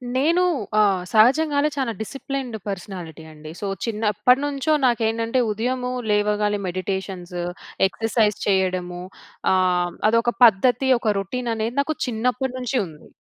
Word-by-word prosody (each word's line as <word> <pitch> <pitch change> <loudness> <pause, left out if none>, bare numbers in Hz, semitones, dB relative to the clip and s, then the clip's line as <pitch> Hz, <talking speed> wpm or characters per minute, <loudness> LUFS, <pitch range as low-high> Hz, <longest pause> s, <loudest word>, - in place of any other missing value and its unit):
నేను, 330 +7 +3 0.4
ఆహ్, 195 -4 +3
సహజంగానే 285 +6 +4
చానా 265 -4 -1
డిసిప్లిన్డ్ 270 0 -5
పర్సనాలిటీ 180 -5 -7
అండి. 155 0 -10
సో, 200 - -3 0.2
చిన్నప్పటినుంచో 250 +7 +1
నాకేంటంటే, 230 0 +1
ఉదయము 250 +4 -2 0.2
లేవగానే 210 0 +1
మెడిటేషన్సు, 185 -1 -4 0.4
ఎక్సర్సైజ్ 220 0 0
చేయడము. 185 -2 0 0.5
ఆహ్, 180 -1 +1 0.2
అదొక 230 +1 +2
పద్ధతి 245 +5 +3
ఒక 215 -2 +1
రొటీన్ 235 +5 -3
అనేది, 225 +2 -3
నాకు 310 +2 -2
చిన్నప్పటినుంచి 250 +2 -1
ఉంది. 155 -1 -15
220 Hz, 110 wpm, -22 LUFS, 190-250 Hz, 0.5 s, సహజంగానే